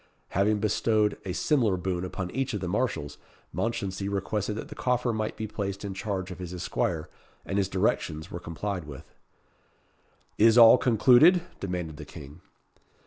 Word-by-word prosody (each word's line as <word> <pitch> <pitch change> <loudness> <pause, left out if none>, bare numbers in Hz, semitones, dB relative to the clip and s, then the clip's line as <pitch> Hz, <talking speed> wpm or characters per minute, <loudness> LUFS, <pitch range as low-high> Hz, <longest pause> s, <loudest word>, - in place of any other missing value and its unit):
Having 105 +3 +2
bestowed 105 0 +1
a 95 - -3
similar 115 - +1
boon 90 0 -2
upon 90 0 -5
each 135 -2 -2
of - - -2
the 90 - -4
marshals, 90 - -2 0.3
Mounchensey 100 -4 -2
requested 105 +1 -2
that 110 - -6
the - - -7
coffer 125 -1 0
might 110 0 -3
be 110 - -3
placed 100 -1 -4
in 100 - -4
charge 95 -1 -4
of 90 - -8
his 90 -1 -6
esquire 85 -2 -2 0.4
and 100 +2 -1
his 95 -1 0
directions 85 -3 -1
were 85 - -5
complied 90 +1 -4
with. 70 -3 -10 1.3
"Is 115 +2 +6
all 115 +1 +9
concluded?" 130 - +5 0.2
demanded 90 -5 -4
the - - -8
King. 75 +4 -12
100 Hz, 160 wpm, -27 LUFS, 90-110 Hz, 1.3 s, all